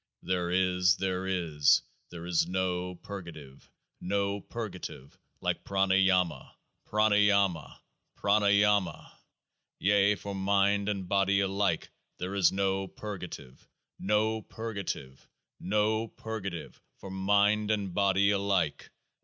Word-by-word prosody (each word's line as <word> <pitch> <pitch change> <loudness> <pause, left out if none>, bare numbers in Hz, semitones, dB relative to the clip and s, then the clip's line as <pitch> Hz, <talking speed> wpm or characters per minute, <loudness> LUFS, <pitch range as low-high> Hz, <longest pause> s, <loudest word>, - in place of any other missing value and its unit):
— - - -41
there 90 -1 0
is, 90 +1 +3
there 95 -1 -2
is, 80 -6 +2 0.3
there 85 -1 -8
is 85 -1 +1
no 90 0 -2
purga 90 -3 -8
tive, 70 -3 -14 0.3
no 100 +2 -1
purgative 95 - -7 0.3
like - - -1
Pranayama 95 -2 +1
— - - -50
Prana 105 0 +3
yama! 100 -4 +2 0.2
— - - -46
Pranayama! 100 -3 +2 0.7
yea, 100 +1 +3
for 100 +1 -7
mind 100 +1 +2
and 100 -3 -3
body 100 +1 +2
alike 95 -3 0 0.3
there 90 +2 -4
is 95 -4 +4
no 95 0 0
purgative, 95 -11 -8 0.3
no 110 +3 +1
purgative, 100 -14 -6 0.3
no 105 +3 0
purgative 105 -7 -7 0.2
(for 95 - -9
mind 100 +2 +2
and 100 -4 -1
body 100 +1 +3
alike 100 -6 0
95 Hz, 120 wpm, -29 LUFS, 90-100 Hz, 0.7 s, is